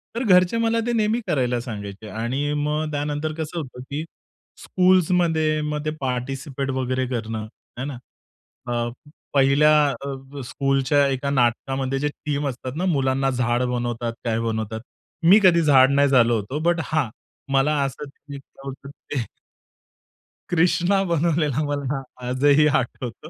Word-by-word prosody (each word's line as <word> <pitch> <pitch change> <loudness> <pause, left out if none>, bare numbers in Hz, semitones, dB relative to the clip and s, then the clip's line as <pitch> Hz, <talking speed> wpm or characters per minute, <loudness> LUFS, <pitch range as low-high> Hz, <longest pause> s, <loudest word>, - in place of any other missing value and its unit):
तर 235 - -1
घरचे 185 -1 +4
मला 230 0 +1
ते 240 - 0
नेहमी 220 0 +1
करायला 125 -4 +1
सांगायचे 105 -3 -7
आणि 130 +7 -2
मग 150 +1 -1
त्यानंतर 150 +1 -2
कसं 160 +1 -5
होतं, 130 -4 -8
की 145 +2 -3 0.6
स्कूल्समध्ये 175 -4 +2
मग 150 0 -3
ते 155 - 0
पार्टिसिपेट 135 +2 -3
वगैरे 130 0 -1
करणं 115 -3 -3 0.4
आहे 130 - -3
ना. 140 -3 -5 0.7
अ, 120 -1 -1 0.4
पहिल्या 140 +2 +5 0.2
अ, 140 0 -7
स्कूलच्या 135 +1 +2
एका 135 +1 -1
नाटकामध्ये 135 +1 0
जे 145 +1 0
थीम 145 -1 -3
असतात 130 0 -6
ना, 180 - -1
मुलांना 135 -5 +1
झाड 120 -1 0
बनवतात, 120 -1 -2
काय 115 -1 0
बनवतात. 110 -1 -3 0.4
मी 185 +6 +7
कधी 170 -3 +6
झाड 135 -4 +5
नाही 140 0 +4
झालो 120 -3 +4
होतो. 110 +7 -3
बट 175 -1 +1
हां, 155 -6 0 0.4
मला 135 +3 +3
असं 135 +2 -4 0.2
वीक 140 -1 -7 0.2
लावून 135 0 -6 0.4
ते 130 -5 -1 1.2
कृष्णा 175 +3 +2
बनवलेला 155 -3 +1
मला 140 -1 -2 0.3
आजही 140 +4 +4
आठवतं 135 -1 -2
140 Hz, 140 wpm, -23 LUFS, 125-155 Hz, 1.2 s, मी